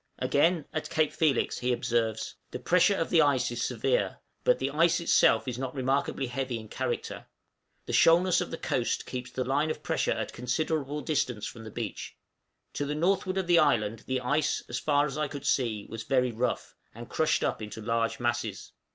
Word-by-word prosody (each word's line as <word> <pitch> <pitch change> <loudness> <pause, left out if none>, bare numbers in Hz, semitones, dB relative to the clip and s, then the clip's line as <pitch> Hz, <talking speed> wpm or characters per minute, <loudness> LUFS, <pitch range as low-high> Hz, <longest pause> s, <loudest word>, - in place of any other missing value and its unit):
Again, 160 +1 +2
at 155 - -3
Cape 155 -1 +1
Felix, 155 -5 +1
he 125 0 0
observes, 115 -2 -1 0.2
"The - - -5
pressure 180 +3 +3
of 165 - -2
the 165 - +6
ice 140 -4 +2
is 120 0 -2
severe, 120 -5 0 0.3
but - - +4
the 135 +1 -2
ice 165 +3 +3
itself 115 -9 +4
is 125 -1 -3
not 130 +1 -4
remarkably 135 +1 0
heavy 125 -1 -3
in 110 -1 -11
character; - - -4 0.6
the - - -5
shoalness 175 +2 +5
of - - -3
the - - -5
coast 120 -3 -1
keeps 125 0 -5
the 130 +1 -2
line 140 +4 +1
of 155 - -4
pressure - - 0
at - - -2
considerable 145 +3 -2
distance 130 -9 -1
from 115 -1 -8
the - - -7
beach; 110 -1 -6 0.6
to 145 - -2
the 150 - -2
northward 185 +3 +1
of 190 - 0
the 175 -1 +5
island 115 -7 +2
the 130 -1 -1
ice, 145 +4 0
as 120 - -3
far 145 -1 +2
as 150 0 -4
I 150 - 0
could 145 -1 -8
see, 115 -6 0
was 115 - -6
very 125 +1 +1
rough, 110 - -2 0.2
and 120 +1 -9
crushed 160 - +1
up - - -1
into 105 +1 -7
large 115 +1 -1
masses." 120 -5 -2
130 Hz, 195 wpm, -28 LUFS, 120-155 Hz, 0.6 s, the